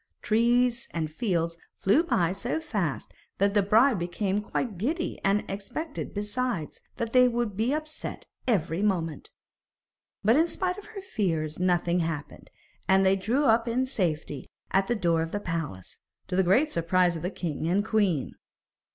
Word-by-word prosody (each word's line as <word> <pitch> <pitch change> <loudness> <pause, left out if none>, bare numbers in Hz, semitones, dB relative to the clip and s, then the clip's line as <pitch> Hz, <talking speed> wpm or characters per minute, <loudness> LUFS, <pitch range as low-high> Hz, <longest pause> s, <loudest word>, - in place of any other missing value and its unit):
Trees 240 +3 +2
and 160 -2 -2
fields 170 -4 -1 0.2
flew 235 - +3
by 180 - +1
so 235 +10 -2
fast 205 - -3 0.2
that 200 +1 +2
the 205 - +4
bride 220 +3 +4
became 190 +4 -1
quite 210 -2 -3
giddy, 320 - -2
and 200 +2 +2
expected, 285 +11 -5
besides, 210 -4 -3 0.2
that 230 -2 -3
they 250 -1 +7
would 235 -4 -1
be 225 +5 +1
upset 310 +1 -4 0.2
every 180 -6 +1
moment. 170 -7 -1 0.9
But, 225 +6 +5
in 325 +2 +4
spite 365 +2 -2
of 410 - -12
her 425 -2 -8
fears, 165 - -2
nothing 175 -1 +2
happened, 160 -3 -4 0.4
and 190 0 +4
they 190 +1 +5
drew 235 +10 0
up 230 -1 +4
in 250 +3 +1
safety 160 - -2 0.2
at 195 0 +2
the 240 - +1
door 170 -6 +2
of 165 0 -3
the 205 - -2
palace, 165 - -5 0.3
to 180 - -1
the 190 - +4
great 240 - +3
surprise 175 +1 +2
of 165 - -5
the 180 - -1
king 160 -5 -3
and 195 +4 +2
queen. 200 - +1
200 Hz, 165 wpm, -27 LUFS, 170-240 Hz, 0.9 s, they